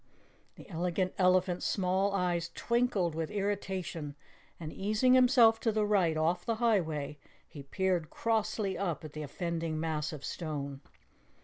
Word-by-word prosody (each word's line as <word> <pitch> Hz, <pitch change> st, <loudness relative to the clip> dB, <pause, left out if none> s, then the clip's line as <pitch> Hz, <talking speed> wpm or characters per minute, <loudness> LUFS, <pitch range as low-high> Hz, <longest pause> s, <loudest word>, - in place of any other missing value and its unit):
The -, -, -13 dB
Elegant 180 Hz, +1 st, -1 dB
Elephant's 185 Hz, -1 st, +3 dB
small 190 Hz, +1 st, +1 dB
eyes 175 Hz, -3 st, 0 dB
twinkled 235 Hz, -8 st, +1 dB
with 160 Hz, 0 st, -3 dB
irritation, 190 Hz, -7 st, -3 dB, 0.4 s
and 155 Hz, -2 st, -6 dB
easing 215 Hz, +6 st, +2 dB
himself 245 Hz, -3 st, +6 dB
to 225 Hz, -, +1 dB
the 215 Hz, -1 st, +1 dB
right 185 Hz, -6 st, +2 dB
off 170 Hz, +3 st, +1 dB
the 230 Hz, -, -1 dB
highway, 160 Hz, -11 st, 0 dB, 0.3 s
he 145 Hz, -, -10 dB
peered 180 Hz, +2 st, -1 dB
crossly 220 Hz, -3 st, -1 dB
up 170 Hz, -5 st, -2 dB
at 150 Hz, -, -9 dB
the 155 Hz, -, -5 dB
offending 165 Hz, +1 st, -3 dB
mass 155 Hz, -2 st, -2 dB
of 150 Hz, -3 st, -7 dB
stone. 140 Hz, -4 st, -5 dB
180 Hz, 140 wpm, -31 LUFS, 160-205 Hz, 0.4 s, himself